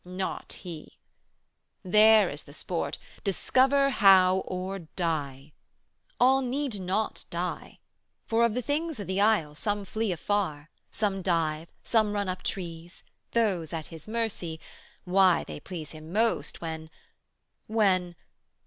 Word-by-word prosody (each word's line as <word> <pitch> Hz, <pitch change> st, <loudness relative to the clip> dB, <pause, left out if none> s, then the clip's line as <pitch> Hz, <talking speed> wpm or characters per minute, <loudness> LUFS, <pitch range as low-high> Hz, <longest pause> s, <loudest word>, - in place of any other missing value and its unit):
Not 185 Hz, +1 st, -4 dB
He! 165 Hz, -4 st, -9 dB, 0.9 s
There 215 Hz, +1 st, +6 dB
is 145 Hz, -, -4 dB
the 145 Hz, -, -13 dB
sport: 170 Hz, +1 st, -3 dB, 0.3 s
discover 270 Hz, +7 st, +3 dB
how 190 Hz, -5 st, +6 dB
or 185 Hz, +2 st, -4 dB
die! 155 Hz, -5 st, -4 dB, 0.7 s
All 265 Hz, +2 st, +5 dB
need 260 Hz, -3 st, -2 dB
not 190 Hz, +4 st, -2 dB
die, -, -, -4 dB, 0.5 s
for 230 Hz, +1 st, +2 dB
of 235 Hz, -2 st, +2 dB
the 250 Hz, -, -1 dB
things 310 Hz, 0 st, -2 dB
o' -, -, -3 dB
the 190 Hz, +1 st, -1 dB
isle 205 Hz, -9 st, +3 dB
Some 205 Hz, +5 st, -2 dB
flee 220 Hz, +1 st, -1 dB
afar, 170 Hz, -4 st, -2 dB, 0.2 s
some 200 Hz, -3 st, -1 dB
dive, 165 Hz, -3 st, 0 dB
some 215 Hz, -3 st, +2 dB
run 205 Hz, -1 st, -1 dB
up 185 Hz, -, -4 dB
trees; 170 Hz, -2 st, -5 dB, 0.3 s
220 235 Hz, -, +4 dB, 0.2 s
Those 160 Hz, -1 st, -8 dB
at 160 Hz, -2 st, -3 dB
His 165 Hz, +3 st, -10 dB
mercy 215 Hz, -8 st, -2 dB, 0.4 s
why, 185 Hz, -1 st, +4 dB
they -, -, -8 dB
please 160 Hz, -1 st, -7 dB
Him 155 Hz, +1 st, -10 dB
most 210 Hz, -8 st, 0 dB
When... 160 Hz, -1 st, -5 dB, 0.8 s
when 185 Hz, -5 st, +2 dB
185 Hz, 135 wpm, -28 LUFS, 165-220 Hz, 0.9 s, There